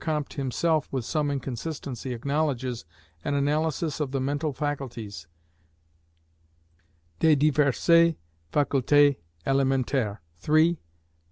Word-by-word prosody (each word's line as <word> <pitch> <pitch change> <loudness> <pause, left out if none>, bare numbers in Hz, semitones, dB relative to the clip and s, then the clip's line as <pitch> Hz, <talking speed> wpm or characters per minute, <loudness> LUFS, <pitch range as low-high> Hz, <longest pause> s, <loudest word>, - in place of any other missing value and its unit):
Comte 150 -3 -2
himself, 145 +4 0
with 130 -4 -2
some 150 +3 0
inconsistency, 135 -1 -4
acknowledges) 130 - -2 0.4
an 145 - -1
analysis 150 +2 0
of 150 -3 -1
the 135 - -1
mental 145 +3 -1
faculties, 125 - -5 1.9
"des 160 -2 +5
diverses 155 +3 +4 0.4
facultés 145 0 +3 0.3
élémentaires," 135 -5 +1 0.3
(iii. 160 +2 +4
140 Hz, 90 wpm, -26 LUFS, 130-155 Hz, 1.9 s, des